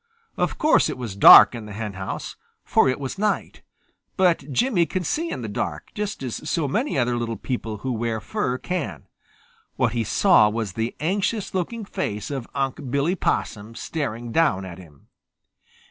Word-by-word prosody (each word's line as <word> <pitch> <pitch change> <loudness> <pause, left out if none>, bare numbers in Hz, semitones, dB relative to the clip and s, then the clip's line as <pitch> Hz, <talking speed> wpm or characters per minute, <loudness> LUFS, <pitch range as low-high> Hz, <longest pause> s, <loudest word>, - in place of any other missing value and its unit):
Of - - -1
course 310 0 +3
it - - -4
was 120 -6 -6
dark 100 - +10
in 115 -3 -7
the 105 - -8
henhouse, 100 -3 -5 0.3
for - - +3
it 130 - -1
was 140 +7 -5
night, 210 -1 -1 0.6
but 170 -7 +2
Jimmy 185 - +2
can 185 -1 -2
see 325 - -1
in - - -5
the - - -3
dark, - - -4
just 210 -8 -4
as 130 +4 -5
so 155 -1 0
many 220 - -1
other 120 -1 +1
little 115 -2 -3
people 115 -2 -4
who 130 +6 -4
wear 115 -1 -2
fur 125 +3 -2
can. 180 +1 -4 0.7
What 120 -3 +1
he 115 -2 0
saw 110 - +4
was 105 -3 -3
the 115 +3 -3
anxious 200 +6 -1
looking 205 +4 -3
face 105 - -4
of 135 -4 -4
Unc' 135 0 -2
Billy 140 +7 +1
Possum 110 - -2
staring 120 -7 -4
down 115 - +2
at 90 -1 -9
him. 75 -6 -17
130 Hz, 175 wpm, -23 LUFS, 110-175 Hz, 0.7 s, dark